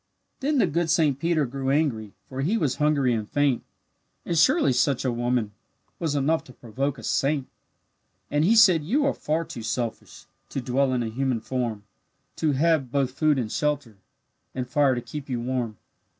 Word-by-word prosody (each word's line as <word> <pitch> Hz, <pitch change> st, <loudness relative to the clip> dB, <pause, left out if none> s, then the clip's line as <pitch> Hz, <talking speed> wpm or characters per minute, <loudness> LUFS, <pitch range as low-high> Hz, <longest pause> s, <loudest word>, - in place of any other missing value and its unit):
Then 290 Hz, +2 st, 0 dB
the 230 Hz, -, +4 dB
good 170 Hz, 0 st, -1 dB
Saint 155 Hz, -5 st, +2 dB
Peter 165 Hz, -2 st, +1 dB
grew 135 Hz, +1 st, -3 dB
angry, 135 Hz, -8 st, 0 dB
For 130 Hz, 0 st, -5 dB
he 190 Hz, +11 st, +1 dB
was 145 Hz, -, 0 dB
hungry 145 Hz, -4 st, +2 dB
and 110 Hz, -2 st, -3 dB
faint; 145 Hz, -4 st, +2 dB, 0.6 s
And 170 Hz, -, -1 dB
surely 255 Hz, -, +4 dB
such 135 Hz, +1 st, +1 dB
a 130 Hz, -, +2 dB
woman 120 Hz, -2 st, -1 dB, 0.5 s
Was 160 Hz, -4 st, -1 dB
enough 150 Hz, +3 st, +1 dB
to 125 Hz, -, -14 dB
provoke 135 Hz, +5 st, -3 dB
a 115 Hz, -, -11 dB
saint. 140 Hz, +2 st, 0 dB, 0.8 s
And 145 Hz, +1 st, +2 dB
he 210 Hz, +7 st, +4 dB
said, 185 Hz, -8 st, +6 dB
"You 270 Hz, -, +1 dB
are 280 Hz, -, +2 dB
far 160 Hz, +2 st, -2 dB
too 120 Hz, -, -8 dB
selfish 115 Hz, +1 st, -4 dB, 0.2 s
To -, -, -3 dB
dwell 130 Hz, +2 st, +1 dB
in 125 Hz, -1 st, 0 dB
a 115 Hz, -, -3 dB
human 130 Hz, +1 st, -1 dB
form, 115 Hz, -3 st, -3 dB, 0.5 s
To 155 Hz, -3 st, +1 dB
have 145 Hz, -3 st, +2 dB
both 135 Hz, -2 st, +1 dB
food 150 Hz, +2 st, +2 dB
and 115 Hz, -4 st, -2 dB
shelter, 145 Hz, -8 st, -1 dB, 0.6 s
And 130 Hz, -1 st, -3 dB
fire 135 Hz, +1 st, +3 dB
to 120 Hz, -, -3 dB
keep 140 Hz, +4 st, -8 dB
you 125 Hz, -2 st, -1 dB
warm. 120 Hz, -3 st, -2 dB
135 Hz, 185 wpm, -25 LUFS, 125-155 Hz, 0.8 s, said